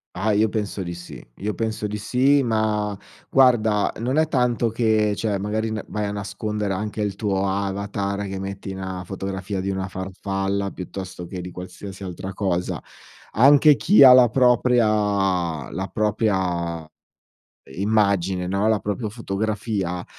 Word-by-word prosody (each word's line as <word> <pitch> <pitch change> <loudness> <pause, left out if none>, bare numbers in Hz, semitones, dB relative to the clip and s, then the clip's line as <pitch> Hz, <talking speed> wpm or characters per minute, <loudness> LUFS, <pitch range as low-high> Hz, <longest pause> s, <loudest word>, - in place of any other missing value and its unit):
Ah, 105 +4 0
io 110 +1 +3
penso 105 -2 -3
di 85 -2 -5
sì. 85 - -10
Io 105 +2 -3
penso 110 -1 -3
di 105 0 -3
sì 135 +6 +3
ma, 110 -4 0 0.3
guarda 110 -6 +3
non 125 +5 -1
è 160 0 +3
tanto 125 -4 +1
che, 110 -2 +2
cioè 105 -1 -1
magari 110 +3 -2
n 110 -2 -3
vai 105 0 -3
a 100 - -2
nascondere 105 0 -3
anche 105 +2 -3
il 105 -1 -1
tuo 100 -2 -1
avatar, 100 +1 -2
che 95 0 -5
metti 95 0 -6
na 95 -1 -5
fotografia 95 +1 -4
di 95 - -3
una 95 0 -2
farfalla 95 +1 -3
piuttosto 95 -1 -7
che 90 +1 -6
di 90 0 -7
qualsiasi 90 +2 -9
altra 95 +1 -6
cosa. 90 -3 -2 0.5
Anche 145 +5 +6
chi 195 +7 +4
ha 130 - +10
la 125 -2 +7
propria 125 -1 +3 0.8
la 95 +3 -3
propria 95 -6 -1 0.9
immagine, 95 -3 +1
no, 100 +3 +1
la 110 -1 +3
propria 105 +2 -3
fotografia, 105 -4 -3
100 Hz, 150 wpm, -23 LUFS, 95-110 Hz, 0.9 s, ha